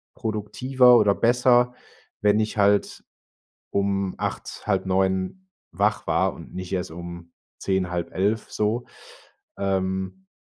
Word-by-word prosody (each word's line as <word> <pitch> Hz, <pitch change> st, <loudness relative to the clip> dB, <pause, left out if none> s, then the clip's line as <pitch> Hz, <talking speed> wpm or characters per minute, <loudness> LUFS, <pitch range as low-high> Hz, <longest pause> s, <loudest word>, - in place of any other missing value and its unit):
produktiver 125 Hz, +4 st, +3 dB
oder 105 Hz, -3 st, +4 dB
besser, 125 Hz, +1 st, +3 dB, 0.5 s
wenn 105 Hz, +1 st, +4 dB
ich 110 Hz, 0 st, -2 dB
halt 100 Hz, 0 st, +2 dB, 0.7 s
um 100 Hz, -1 st, 0 dB
08:00, -, -, -5 dB
08:30 95 Hz, -, 0 dB, 0.3 s
wach -, -, 0 dB
war -, -, +2 dB
und -, -, -12 dB
nicht 95 Hz, 0 st, -6 dB
erst 90 Hz, -2 st, -2 dB
um 85 Hz, 0 st, -9 dB, 0.3 s
10:00, 95 Hz, -2 st, -1 dB
10:30 95 Hz, +5 st, -1 dB
so, 110 Hz, +3 st, -1 dB, 0.7 s
ähm. 95 Hz, -, -2 dB
100 Hz, 110 wpm, -24 LUFS, 95-110 Hz, 0.7 s, oder